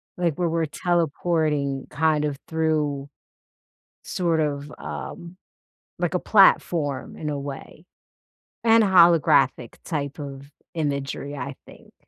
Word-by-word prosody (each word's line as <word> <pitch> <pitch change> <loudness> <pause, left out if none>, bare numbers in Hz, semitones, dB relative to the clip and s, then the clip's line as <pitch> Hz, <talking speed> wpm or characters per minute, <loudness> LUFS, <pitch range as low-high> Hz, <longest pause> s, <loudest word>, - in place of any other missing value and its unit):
Like, 170 -4 0
where 175 -2 0
we're 165 0 0
teleporting 155 -4 0
kind 155 0 +1
of 145 -2 -3
through 150 -3 -1 0.9
sort 170 -3 0
of, 145 -1 -2
um, 170 +2 -8 0.6
like, 175 0 -1
a 180 - +1
platform 160 -8 +3
in 150 - -4
a 145 - -2
way, 140 +4 -8 0.8
and 225 0 +5
holographic 170 - +4
type 145 -3 -4
of 140 0 -8 0.2
imagery, 145 -2 -3
I 140 0 -5
think. - - -17
150 Hz, 115 wpm, -24 LUFS, 140-170 Hz, 0.9 s, and